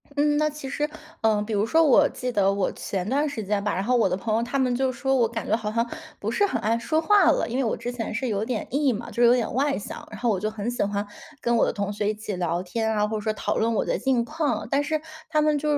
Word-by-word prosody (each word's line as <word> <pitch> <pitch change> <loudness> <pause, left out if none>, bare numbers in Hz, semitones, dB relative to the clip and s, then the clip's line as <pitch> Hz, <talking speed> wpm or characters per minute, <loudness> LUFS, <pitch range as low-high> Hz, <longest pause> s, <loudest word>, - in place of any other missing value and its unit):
嗯， 295 0 +2
那 305 0 +3
其 300 -2 -7
实， 295 +2 -1 0.3
呃， 220 -2 +3
比 215 +1 -4
如 205 0 +2
说 320 +8 +3
我 290 -1 +6
记 250 0 -4
得 195 -4 +3
我 200 -2 0
前 190 -2 -4
段 285 +4 +1
时 255 -7 -4
间 200 0 -1
吧， 205 - 0
然 190 - -1
后 250 +4 +2
我 230 -4 +4
的 180 - 0
朋 215 +2 -1
友 230 - +1
他 245 +4 -1
们 250 -2 +2
就 260 +1 +1
说 265 +2 0
我 240 -3 +3
感 225 0 -5
觉 220 - +3
好 215 -2 -3
像 230 +2 0 0.3
不 - - -2
是 405 - +2
很 380 - -2
爱 225 +1 +1
说 310 +7 0
话 400 +2 +5
了， - - 0
因 240 - -3
为 270 - +1
我 225 - 0
之 245 - -5
前 235 -3 -4
是 255 +4 -2
有 210 -2 -1
点 250 - -3
E 280 0 +2
嘛， 230 +2 -6
就 240 - 0
有 240 0 +7
点 245 -2 0
外 280 +1 +1
向。 - - -8
然 215 - -8
后 240 - +1
我 200 -4 +1
就 215 +3 -2
很 215 +1 -3
喜 245 - -1
欢 205 0 -2 0.3
跟 235 0 +1
我 230 - +4
的 - - 0
同 200 0 -2
学 205 0 -1
一 - - 0
起 210 -1 -5
聊 175 -1 -1
天 220 +5 -1
啊， 210 -1 +1
或 220 0 -2
者 - - -4
说 215 +1 -1
讨 - - -2
论 230 +1 +1
我 215 - +1
的 - - 0
近 260 -3 +1
况， 295 -6 -1
但 280 +1 +2
是 310 +1 -1 0.3
他 305 -1 +2
们 300 -1 +3
就 300 +1 0
235 Hz, 325 characters per minute, -25 LUFS, 210-275 Hz, 0.3 s, 有